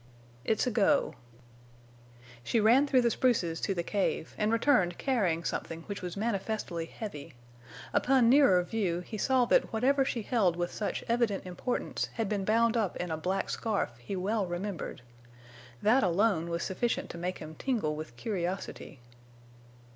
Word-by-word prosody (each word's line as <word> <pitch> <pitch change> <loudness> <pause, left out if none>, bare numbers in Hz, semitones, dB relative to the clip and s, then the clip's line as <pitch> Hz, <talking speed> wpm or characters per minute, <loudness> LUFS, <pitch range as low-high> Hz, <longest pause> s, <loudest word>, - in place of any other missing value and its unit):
"It's 220 - +1
a 250 - 0
go." 230 +7 +2 1.3
She 230 - +1
ran 240 +7 +5
through 260 -2 +4
the 235 - +3
spruces 185 -12 +1
to 195 - -1
the 170 - -1
cave, 195 -4 -1
and 210 +1 0
returned 230 -7 +3
carrying 190 -11 0
something 165 0 -4
which 200 +2 -6
was 180 +1 -5
manifestly 200 -5 -2
heavy. 155 - -8 0.6
Upon 260 -2 +4
nearer 235 -9 +6
view 180 -4 -1
he 215 +4 -7
saw 260 +1 +3
that - - +3
whatever 270 +5 +2
she 235 -4 -2
held 200 -7 +2
with 175 0 -2
such 210 - -3
evident 230 -5 0
importance 185 +7 -3
had 225 -2 -1
been 200 -1 -2
bound 230 +2 +3
up 215 -6 0
in 175 -1 -4
a - - 0
black 180 +5 -2
scarf 215 - -1
he 120 +11 -5
well 200 +2 -1
remembered. 175 -6 -5 0.8
That 245 +6 +5
alone 180 -2 +2
was 170 0 -2
sufficient 230 +5 -2
to 170 - -8
make 180 +1 -3
him 155 0 -9
tingle 205 - -1
with 155 -6 -7
curiosity. 180 - -4
205 Hz, 160 wpm, -30 LUFS, 175-230 Hz, 1.3 s, nearer